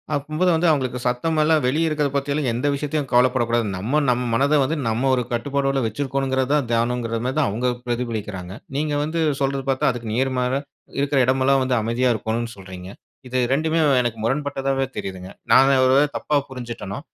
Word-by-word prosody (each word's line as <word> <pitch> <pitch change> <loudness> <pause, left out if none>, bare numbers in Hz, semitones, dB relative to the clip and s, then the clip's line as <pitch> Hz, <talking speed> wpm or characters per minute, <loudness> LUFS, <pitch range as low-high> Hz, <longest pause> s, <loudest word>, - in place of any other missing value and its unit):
அப்பம்போது 155 +5 0
வந்து 165 +2 +2
அவுங்களுக்கு 130 -5 0
சத்தமெல்லாம் 155 +5 +2
வெளிய 155 +6 +1
இருக்கறத 150 -2 0
பத்தி 140 0 -1
எல்லாம் 145 -3 0
எந்த 125 +5 -1
விஷயத்தையும் 145 -1 -2
கவலைப்படக்கூடாது. 120 -2 +2
நம்ம 120 +11 0
நம் 125 0 +1
மனத 140 +5 +3
வந்து 155 +5 -1
நம்ம 115 +4 0
ஒரு 125 - 0
கட்டுப்பாட்டோட 135 +2 0
வச்சிருக்கோணுங்கிறது 130 +2 -1
தான் 145 -4 +1
தியானங்குற 115 0 0
மாரி 130 +2 -1
தான் 150 - +2
அவுங்க 120 +5 -1 0.2
பிரதிபலிக்கிறாங்க. 110 -7 -4 0.2
நீங்க 150 0 -1
வந்து 160 +2 -2 0.2
சொல்றத 135 0 0
பாத்தா, 135 0 +2
அதுக்கு 120 -2 -6
நேர்மாற, 125 0 0 0.5
இருக்குற 140 0 +1
இடமெல்லாம் 135 +1 +3
வந்து 130 -1 +1
அமைதியா 120 +3 +1
இருக்கோணும்னு 115 +2 -3
சொல்றீங்க. 95 -1 -9 0.4
இது 130 +1 0
2மே 160 +3 +1 0.2
எனக்கு 120 -2 -2
முரண்பட்டதாவே 135 +1 -1
தெரியுதுங்க. 95 -1 -6 0.2
நான் 135 +1 +6
ஒ - - +4
ஒருவேள 135 +3 +4
தப்பா 150 - -1
புரிஞ்சுட்டனோ, 120 -4 -6
130 Hz, 165 wpm, -22 LUFS, 120-140 Hz, 0.5 s, நான்